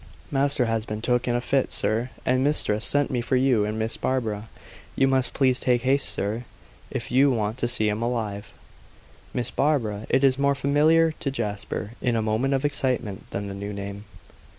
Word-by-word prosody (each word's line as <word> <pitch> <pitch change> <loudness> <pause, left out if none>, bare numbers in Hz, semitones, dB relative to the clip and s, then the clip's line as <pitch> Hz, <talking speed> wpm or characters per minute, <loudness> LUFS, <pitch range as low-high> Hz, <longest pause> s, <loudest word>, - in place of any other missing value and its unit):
"Master 140 -2 +3
has 115 -1 -1
been 105 0 -4
took 125 +2 0
in 120 - +1
a 120 - 0
fit, 135 +1 0
sir, 110 +5 +1 0.2
and 130 +1 +2
mistress 115 -7 +1
sent 145 -1 +2
me 125 -2 0
for 125 +2 0
you 125 -5 +3
and 105 +1 -3
Miss 110 0 -2
Barbara. 110 -4 -2 0.5
You 135 - +3
must 130 -1 +1
please 130 -2 +2
make 120 -1 +3
haste, 135 +2 +2
sir, 110 +5 -2 0.4
if - - -5
you 135 +3 +5
want 110 -1 -1
to 120 - 0
see 115 -3 +2
him 105 +1 -1
alive." 110 -4 -3 0.8
Miss 125 - -2
Barbara! 115 -8 0
It 135 - +2
was 135 0 +3
more 140 0 +2
familiar 155 +4 +3
to 140 - -1
Jasper, 105 -4 -4
in 120 -2 +1
a 115 - +1
moment 115 +6 +1
of 135 - -1
excitement, 125 -8 -1
than 100 0 -4
the 100 - -5
new 100 +1 -5
name. 100 +1 -7
120 Hz, 195 wpm, -25 LUFS, 110-135 Hz, 0.8 s, you